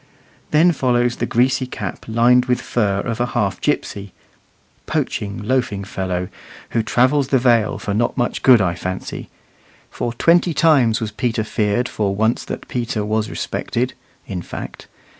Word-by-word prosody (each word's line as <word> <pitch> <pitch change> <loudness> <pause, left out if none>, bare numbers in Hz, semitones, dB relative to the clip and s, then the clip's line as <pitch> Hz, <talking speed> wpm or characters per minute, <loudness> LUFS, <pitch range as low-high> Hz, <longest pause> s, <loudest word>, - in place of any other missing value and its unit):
Then 160 +4 +5
follows 125 -4 +1
the - - -1
greasy 130 +2 +1
cap - - -6
lined 120 +2 +4
with 125 -1 +1
fur 100 -4 0
of 115 0 -4
a 120 - +2
half - - 0
gipsy, 100 -2 -2 0.7
poaching, 100 -1 -2
loafing 120 -4 0
fellow, 95 -2 -3 0.4
who 115 - +1
travels 130 +5 +2
the 135 - +3
Vale 115 -5 +2
not 110 +4 +1
for - - -4
much 120 - -1
good, 125 -4 +6
I 90 -3 +1
fancy: 90 +1 -5 0.6
"For 120 - -3
twenty 170 +5 +3
times 135 -10 +4
was 110 -1 -3
Peter 115 +1 -1
feared 105 +3 0
For 100 -2 -1
once 110 +3 +1
that - - -6
Peter 115 -4 -2
was 110 0 -1
respected," 125 +2 -2 0.3
in 90 -3 -4
fact. - - -8
115 Hz, 155 wpm, -20 LUFS, 105-125 Hz, 0.7 s, good